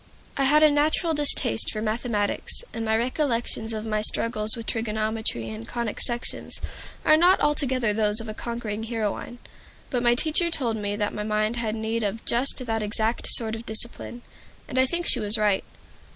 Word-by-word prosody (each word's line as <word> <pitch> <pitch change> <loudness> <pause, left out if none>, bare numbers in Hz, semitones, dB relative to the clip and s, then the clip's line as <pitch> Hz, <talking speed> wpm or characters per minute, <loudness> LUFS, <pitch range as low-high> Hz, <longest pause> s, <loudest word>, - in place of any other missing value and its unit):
I 275 - +1
had 300 +3 +5
a 305 - +6
natural 310 +3 +2
distaste 290 - +3
for 215 - -4
mathematics, 215 - -2
and 225 - -4
my 220 0 +1
recollections 235 -3 -1
of 215 0 -4
my 215 -1 -1
struggles 215 +1 +1
with 230 - -7
trigonometry 220 - -2
and 110 +1 -8
conic 235 -3 -4
sections 240 0 0 0.5
are 310 - +6
not 355 +4 +4
altogether 260 -7 +1
those 210 0 +2
of 225 - -7
a 215 - -5
conquering 225 -2 -5
heroine. 225 +1 -4 0.5
But 245 - 0
my 240 0 +3
teacher 320 +6 +1
told 250 -8 -1
me 205 -1 -3
that 205 0 -2
my 210 - -4
mind 215 +2 -1
had 225 -2 -2
need 225 +1 -2
of 210 +1 -3
just 255 +2 0
that 225 -1 -1
exact 220 +2 0
sort 220 -2 +6
of 225 +1 -7
discipline, 235 +2 -4 0.4
and 260 - -2
I 260 - +4
think 345 +5 -2
she - - +2
was 210 +1 +5
right. 210 -2 +1
225 Hz, 180 wpm, -25 LUFS, 215-250 Hz, 0.5 s, a